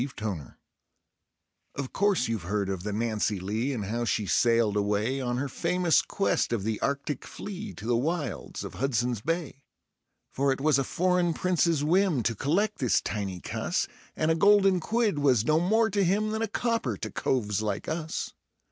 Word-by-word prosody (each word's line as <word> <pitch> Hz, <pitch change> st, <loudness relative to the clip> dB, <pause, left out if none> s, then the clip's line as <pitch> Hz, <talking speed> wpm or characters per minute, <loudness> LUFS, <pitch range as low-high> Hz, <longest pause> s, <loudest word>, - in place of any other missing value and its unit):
Lucille 105 Hz, -, -5 dB, 1.2 s
Of 135 Hz, -2 st, -5 dB
course 200 Hz, -9 st, +2 dB
you've 115 Hz, -3 st, -2 dB
heard 100 Hz, -1 st, 0 dB
of 95 Hz, -2 st, -3 dB
the 105 Hz, +3 st, -3 dB
Nancy 110 Hz, -2 st, -1 dB
Lee, 110 Hz, +8 st, -2 dB
and 110 Hz, -7 st, -3 dB
how 115 Hz, +4 st, -2 dB
she 110 Hz, -2 st, 0 dB
sailed 115 Hz, 0 st, +3 dB
away 105 Hz, +6 st, 0 dB
On 120 Hz, -1 st, -1 dB
her 140 Hz, +3 st, -1 dB
famous 175 Hz, +4 st, +2 dB
quest 195 Hz, -, 0 dB
of 115 Hz, -5 st, -1 dB
the 110 Hz, 0 st, -2 dB
Arctic 140 Hz, 0 st, -2 dB
flea, 205 Hz, +1 st, -7 dB
to 105 Hz, -, -9 dB
the 120 Hz, +1 st, +2 dB
wilds 150 Hz, +3 st, -2 dB
of -, -, -7 dB
Hudson's 120 Hz, -3 st, -1 dB
Bay? 165 Hz, -1 st, -3 dB, 0.7 s
For 140 Hz, +1 st, +1 dB
it 130 Hz, -, -1 dB
was 145 Hz, -1 st, +3 dB
a -, -, +1 dB
foreign 180 Hz, +2 st, +1 dB
Prince's 170 Hz, -4 st, +1 dB
whim 170 Hz, -, +2 dB
to 115 Hz, -, +1 dB
collect 175 Hz, -, 0 dB
this 125 Hz, -4 st, +3 dB
tiny 95 Hz, -4 st, -4 dB
cuss, -, -, -1 dB, 0.3 s
And 155 Hz, +1 st, +1 dB
a -, -, +3 dB
golden 195 Hz, +1 st, +5 dB
quid 215 Hz, -2 st, 0 dB
was 130 Hz, -6 st, +3 dB
no 155 Hz, +1 st, +3 dB
more 220 Hz, +5 st, +2 dB
to 200 Hz, 0 st, +2 dB
him 205 Hz, +4 st, +1 dB
than 220 Hz, +1 st, -2 dB
a 225 Hz, -, +1 dB
copper 225 Hz, -, -1 dB
to 110 Hz, -, -5 dB
coves 105 Hz, -5 st, 0 dB
like 105 Hz, -2 st, -3 dB
us. 160 Hz, 0 st, -3 dB
135 Hz, 180 wpm, -28 LUFS, 110-180 Hz, 1.2 s, golden